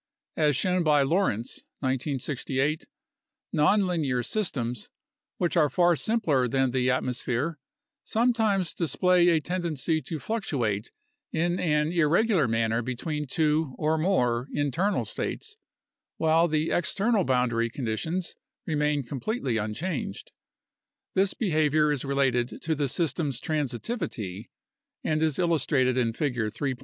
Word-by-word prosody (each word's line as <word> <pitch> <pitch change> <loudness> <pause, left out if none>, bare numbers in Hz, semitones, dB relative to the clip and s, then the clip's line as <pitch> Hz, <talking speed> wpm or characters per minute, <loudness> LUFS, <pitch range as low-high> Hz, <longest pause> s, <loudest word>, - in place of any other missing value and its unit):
As 150 -3 +2
shown 180 +5 +1
by 150 -3 +4
Lorenz 135 - 0 0.2
(1968), 135 +2 -1 0.7
nonlinear 155 - +2
systems, 125 - -2 0.5
which 175 0 0
are 155 -4 +4
far 175 +4 +3
simpler 160 - +1
than 130 +1 +1
the 125 0 +1
atmosphere, 130 +4 -1 0.4
sometimes 220 -6 +1
display 180 +1 +3
a 165 -2 +4
ten 180 +4 -3
dency 160 -1 -1
to 160 - -3
fluctuate 125 - -2 0.4
in 175 +2 0
an 150 -1 +1
irregular 170 - +3
manner 115 0 +1
between 145 +5 -3
two 150 -1 +1
(or 155 +1 +1
more) 125 -9 +1
in 145 -1 0
ternal 195 +8 0
states, 435 -1 -4 0.6
while 165 +1 +3
the 155 0 0
external 200 +6 +1
boundary 125 -3 +1
conditions 140 +10 -3 0.3
remain 150 -2 0
completely 135 - -2
unchanged. 120 - -4 0.8
This 195 0 +2
behavior 155 - +2
is 145 -4 -1
related 130 -4 0
to 160 - 0
the 145 -2 0
system's 145 -3 -1
transitivity 125 - -3 0.5
and 155 0 0
is 155 -3 +1
illustrated 145 -7 +2
in 120 -3 +1
Figure 120 -5 -1
3. 135 +5 -2
150 Hz, 120 wpm, -27 LUFS, 130-175 Hz, 0.8 s, by